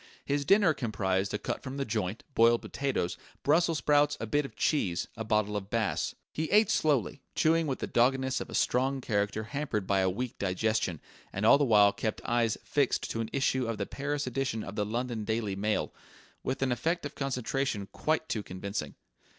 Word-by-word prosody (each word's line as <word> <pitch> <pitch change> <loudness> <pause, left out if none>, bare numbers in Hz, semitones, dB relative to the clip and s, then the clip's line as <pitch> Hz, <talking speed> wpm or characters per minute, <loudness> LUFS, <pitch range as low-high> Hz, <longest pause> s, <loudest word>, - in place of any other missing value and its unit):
His 140 0 0
dinner 195 -1 +5
comprised 100 -6 -1
a - - -1
cut - - -4
from 135 0 -6
the 140 - -1
joint, 105 -2 -2
boiled 115 0 +4
potatoes, 135 -11 -2 0.2
brussels 165 +2 +3
sprouts, 145 +1 +3
a - - -3
bit 145 +6 +1
of - - -10
cheese, 95 - 0
a 110 - -4
bottle 105 -1 +1
of 100 -1 -4
Bass. 115 -2 -1 0.2
He 160 +1 -2
ate 215 +1 +5
slowly, 145 - +1
chewing 160 0 +3
with 135 - -1
the - - -3
doggedness 130 +2 +2
of - - -6
a - - -5
strong 135 +2 +1
character 105 -2 -1
hampered 120 -5 -3
by 100 0 +2
a 95 0 +3
weak 120 +6 -4
digestion, 95 -3 0 0.3
and 100 +3 -2
all 130 - +7
the 145 - +3
while 105 -4 +6
kept 110 - -2
eyes 120 -2 +1
fixed 140 -3 0
to 115 - -2
an 110 - -4
issue 130 -2 +1
of 115 -1 -2
the 100 - -2
Paris 145 +3 -3
edition 130 -3 -2
of 100 - -7
the 105 -1 -1
London 120 0 -2
Daily 110 -2 -1
Mail, 105 +2 -1 0.5
with 135 - -2
an 130 - +1
effect 160 +8 -1
of 145 - -5
concentration 130 -5 -2
quite 155 +8 0
too 110 - -2
convincing. 95 -6 -5
115 Hz, 195 wpm, -30 LUFS, 105-140 Hz, 0.5 s, all